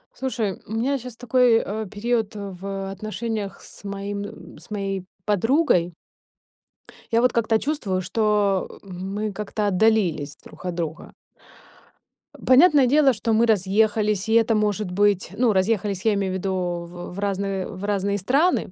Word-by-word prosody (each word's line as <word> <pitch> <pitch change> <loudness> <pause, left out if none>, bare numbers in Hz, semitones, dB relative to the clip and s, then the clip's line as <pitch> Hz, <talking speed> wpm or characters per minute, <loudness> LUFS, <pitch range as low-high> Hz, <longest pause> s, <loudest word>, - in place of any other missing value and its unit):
Слушай, 235 -7 -3
у 220 - -6
меня 265 +5 0
сейчас 250 -1 -9
такой, 245 0 +3
э, 215 0 -3
период 220 +1 -1
в 195 -1 -5
отношениях 215 +1 -4
с - - -15
моим 200 0 -4
м, 205 - -10
с - - -18
моей 195 -3 -3 0.2
подругой. 210 - +2 1.2
Я 230 0 +3
вот 250 -1 +3
как-то 225 -1 +2
чувствую, 215 -11 -1
что, 205 -1 0
э, - - -21
мы 195 +3 -4
как-то 210 +1 -2
отдалились 180 -8 +1
друг - - -13
от 180 -1 -3
друга. 165 -1 -5 1.2
Э, - - -13
понятное 280 0 +6
дело, 280 0 +5
что 225 +1 -1
мы 225 +2 +4
разъехались, 210 0 +2
и - - +2
это 225 0 +4
может 210 -2 0
быть. 200 0 +2
Ну, 240 -3 +3
разъехались, 195 0 0
я 220 - +4
имею 195 -2 -1
в - - -2
виду, 190 +1 -2 0.3
в - - -13 0.2
в - - -10
в 195 - -7
разные 195 -1 -2
в 185 +1 -9
разные 200 0 0
страны, 275 - +1
205 Hz, 160 wpm, -23 LUFS, 195-225 Hz, 1.2 s, понятное